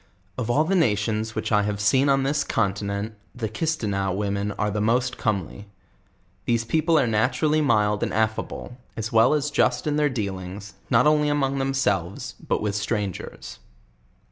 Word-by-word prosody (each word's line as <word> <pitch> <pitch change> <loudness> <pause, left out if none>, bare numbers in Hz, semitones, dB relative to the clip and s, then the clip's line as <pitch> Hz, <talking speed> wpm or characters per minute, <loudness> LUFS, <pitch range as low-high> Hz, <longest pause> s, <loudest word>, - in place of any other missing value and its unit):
Of 115 +1 -3
all 145 +6 +3
the 175 +5 -1
nations 110 - +1
which - - -3
I 105 -1 +4
have 100 0 -2
seen 130 +7 +3
on 135 -1 +3
this 145 +2 +1
continent, 100 0 -1 0.2
the 115 -3 -3
Kisteneaux 110 -7 -1
women 100 +1 -1
are 105 +1 -1
the 105 +1 -1
most 120 +3 +1
comely. 100 -1 -3 0.8
These 115 -1 +1
people 160 +6 +2
are 135 - +3
naturally 125 +7 +1
mild 105 -6 +2
and - - -1
aria 110 0 +1
ble, 125 - -9 0.2
as 110 0 -3
well 115 +6 +5
as 150 0 -1
just 145 - +1
in 150 -1 0
their 150 -1 +3
deal 100 -7 -3
ings, 100 +2 -8 0.2
not 120 0 +4
only 150 0 +3
among 140 -2 0
themselves, 105 -9 -1
but - - 0
with 105 -1 -1
strangers. 100 -2 -4
110 Hz, 170 wpm, -24 LUFS, 105-135 Hz, 0.8 s, well